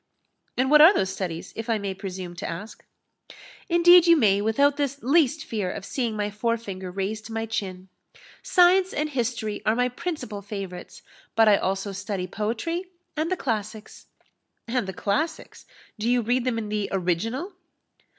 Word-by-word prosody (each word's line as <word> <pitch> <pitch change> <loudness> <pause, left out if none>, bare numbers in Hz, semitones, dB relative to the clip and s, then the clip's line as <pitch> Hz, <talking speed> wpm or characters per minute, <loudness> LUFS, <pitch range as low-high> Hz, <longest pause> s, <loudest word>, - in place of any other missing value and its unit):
"And 260 +2 +1
what 300 0 +8
are 340 +6 +9
those 190 - +1
studies, 175 -4 -5
if 225 +1 -6
I 225 - +2
may 200 -2 -3
presume 185 -2 -7
to - - -4
ask?" 190 +7 -8 0.9
"Indeed 345 0 +7
you 335 -1 +7
may, 205 -7 +3
without 280 +7 +3
the 280 -1 -1
least 300 +2 +2
fear 210 -5 -2
of - - -7
seeing 235 -3 -2
my 210 0 -2
fore 230 +3 0
finger 190 -5 -7
raised 200 +4 -4
to 225 - -9
my 225 0 -2
chin. 190 -4 -4 0.5
Science 365 +1 +4
and 305 +1 -1
history 230 -5 -2
are 215 - +2
my 250 +1 +1
principal 275 - -5
favourites; 195 -3 -8 0.3
but 225 0 +5
I 205 -1 +6
also 195 +2 -2
study 195 -1 -4
poetry 230 - -3 0.3
and 315 +3 -1
the 370 - +1
classics." 215 -4 -4 0.6
"And 240 -3 -1
the 190 - -4
classics? 310 - -3 0.3
Do 225 +3 0
you 245 -1 +2
read 245 +2 0
them 250 -3 0
in 215 -2 -4
the 210 -1 -2
original?" 215 - -1
225 Hz, 170 wpm, -25 LUFS, 200-275 Hz, 0.9 s, are